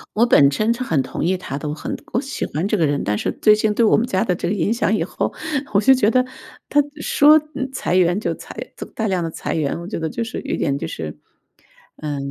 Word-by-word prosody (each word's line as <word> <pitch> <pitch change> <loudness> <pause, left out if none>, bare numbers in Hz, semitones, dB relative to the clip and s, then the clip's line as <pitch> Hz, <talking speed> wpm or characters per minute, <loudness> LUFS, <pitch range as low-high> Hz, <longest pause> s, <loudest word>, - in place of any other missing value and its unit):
我 225 +3 +4
本身 215 +3 +4
是 240 - -8
很 160 - 0
同 - - -5
意 185 +2 +1
他 140 -6 -6
的， 150 - -4
我 150 - -2
很 155 - -5 0.2
我 - - +2
喜 275 +1 -4
欢 160 +6 -2
这 210 - +1
个 165 - +3
人。 145 0 -1
但 105 +1 0
是 - - -1
最 215 -1 +5
近 215 0 +1
对 230 +1 +3
我 - - +5
们 225 - +2
家 190 -1 +1
的 180 -5 0
这 - - -3
个 185 - 0
影 205 +3 +1
响 225 -2 +1
以 195 - 0
后， 170 - -2 0.4
我 200 - +5
就 240 +6 +6
觉 225 -5 +3
得 255 +2 +3 0.5
他 290 - +4 0.2
说 300 +2 +6 0.2
嗯， 265 -1 -3
裁 250 -8 -1
员 180 +1 +3
就 - - -1
裁 - - -11 0.4
大 220 - -1
量 185 -3 0
的 165 - -2
裁 - - -4
员， 155 0 -1
我 170 - -8
觉 200 - -4
得 160 - -2
就 230 - -3
是 225 - -5
有 - - -3
点 140 - 0
就 - - -4
是， 75 -1 -6 0.8
呃 150 -2 -4
195 Hz, 285 characters per minute, -21 LUFS, 160-230 Hz, 0.8 s, 就